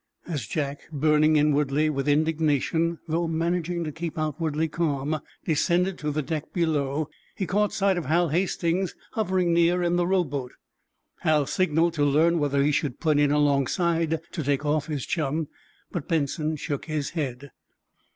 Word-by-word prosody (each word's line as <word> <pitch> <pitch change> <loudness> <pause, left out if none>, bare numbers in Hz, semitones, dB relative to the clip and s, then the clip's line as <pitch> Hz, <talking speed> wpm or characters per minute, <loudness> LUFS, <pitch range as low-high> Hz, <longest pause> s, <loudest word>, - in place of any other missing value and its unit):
As 145 -10 -4
Jack, 145 +1 -3
burning 155 +1 +3
inwardly 150 0 +2
with 140 -2 -1
indignation, 160 +2 +1
though 165 +1 0
managing 170 +1 -1
to 155 - -4
keep 165 +1 -5
outwardly 155 0 -1
calm, 155 -2 -1 0.3
descended 175 +4 +1
to 150 - -2
the 150 0 -1
deck 155 +1 -4
below, 150 -3 0 0.3
he 190 - -2
caught 205 +4 +1
sight 195 -2 +1
of 170 - -6
Hal 170 +2 +2
Hastings, 175 +2 0 0.2
hovering 185 -5 +1
near 170 +1 +3
in 175 0 +1
the 175 0 +1
rowboat. 145 -9 -1 0.7
Hal 150 -2 +2
signaled 165 +2 +1
to 150 -3 0
learn 160 +4 +3
whether 140 -1 +1
he 150 - +3
should 145 -4 -1
put 155 -3 +2
in 145 -1 +4
alongside 155 +3 +1
to 160 - -3
take 140 +1 0
off 150 0 +1
his 145 -5 -3
chum, 155 -1 -1 0.4
but 170 -6 -4
Benson 155 0 0
shook 145 -1 -4
his 155 -3 -2
head. 140 -4 -4
155 Hz, 160 wpm, -26 LUFS, 145-170 Hz, 0.7 s, in